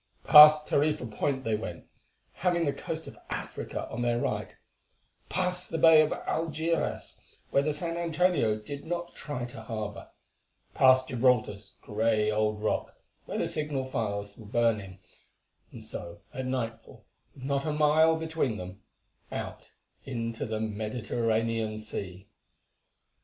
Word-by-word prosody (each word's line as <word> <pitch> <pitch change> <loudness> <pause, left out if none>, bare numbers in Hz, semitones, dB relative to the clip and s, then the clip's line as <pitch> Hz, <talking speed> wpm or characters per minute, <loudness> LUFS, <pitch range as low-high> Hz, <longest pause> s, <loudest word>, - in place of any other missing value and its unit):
Past 150 0 +9
Tarifa 150 -3 +1
Point 130 +5 -2
they 115 - -1
went, 110 - -6 0.5
having 175 -2 +1
the 140 - 0
coast - - -5
of - - -11
Africa - - -5
on 120 - -4
their 120 -1 +1
right; - - -2 0.7
past 180 0 0
the 165 - -2
bay 160 -1 +8
of 155 - +2
Algeçiras, 165 +1 -2 0.4
where 140 - +4
the 150 +2 0
San 165 +3 -3
Antonio 170 -9 +2
did 140 +7 -8
not 175 +1 -4
try 140 -5 -5
to 120 -2 -9
harbour; 110 -2 -6 0.6
past 130 0 +5
Gibraltar's 115 -6 +1
grey 110 0 +1
old 105 0 0
rock, 110 - -1 0.3
where - - -4
the - - 0
signal 140 -4 -2
fires 100 -3 -3
were 110 - -12
burning, 105 -4 0 0.7
and - - -9
so 85 0 -7
at 130 0 -4
nightfall, 120 -3 -5 0.3
with 130 - -12
not 140 +2 -1
a - - +1
mile 155 +2 +4
between 160 -8 -1
them, 90 +1 -8 0.5
out - - -6 0.3
into 115 -3 -4
the 110 -1 -2
Mediterranean 110 0 -1
Sea. 100 -3 -7
125 Hz, 135 wpm, -29 LUFS, 110-150 Hz, 0.7 s, Past